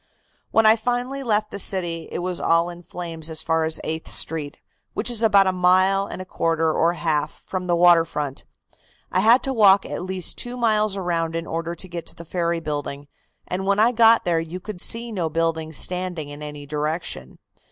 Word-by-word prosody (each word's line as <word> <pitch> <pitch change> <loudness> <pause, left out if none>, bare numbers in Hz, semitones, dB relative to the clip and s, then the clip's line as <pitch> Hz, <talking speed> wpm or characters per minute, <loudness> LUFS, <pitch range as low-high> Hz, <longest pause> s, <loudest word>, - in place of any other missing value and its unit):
"When 225 - +3
I 215 +1 +7
finally 245 +4 -2
left 215 -4 0
the 200 - -5
city, 175 -4 0
it - - -4
was 180 -1 -1
all 165 +1 +2
in 175 0 -11
flames 165 -2 -6
as 160 0 -3
far 160 0 +1
as 160 0 -1
Eighth 160 0 -4
Street, 150 -3 -1 0.4
which 235 - 0
is 230 -2 +2
about 200 -3 +5
a 190 - +2
mile 185 +2 +3
and - - -7
a 185 - -6
quarter 165 -3 0
or 170 +1 +2
half 160 -4 -1
from 185 -1 -4
the 175 - +2
water 170 -1 +6
front. 145 -4 -4 0.7
I - - +2
had 230 +6 +5
to 270 - -1
walk 200 -4 +5
at - - -5
least 185 -1 -2
two 245 +1 -3
miles 215 -4 +2
around 165 -3 -1
in 165 0 -3
order 165 +1 -4
to 185 - -5
get 170 -2 -7
to - - -8
the 170 - -11
ferry 170 0 -1
building, 145 -2 -5 0.4
and 190 +2 -3
when 200 0 +2
I 225 +3 +4
got 230 -1 +5
there 170 -2 +2
you 165 +3 -6
could 185 -1 -8
see 235 +1 +1
no 175 -6 -2
buildings 160 -1 -2
standing 180 -4 -2
in 145 +1 -10
any 150 -1 -8
direction. 150 - -4
175 Hz, 205 wpm, -22 LUFS, 160-200 Hz, 0.7 s, I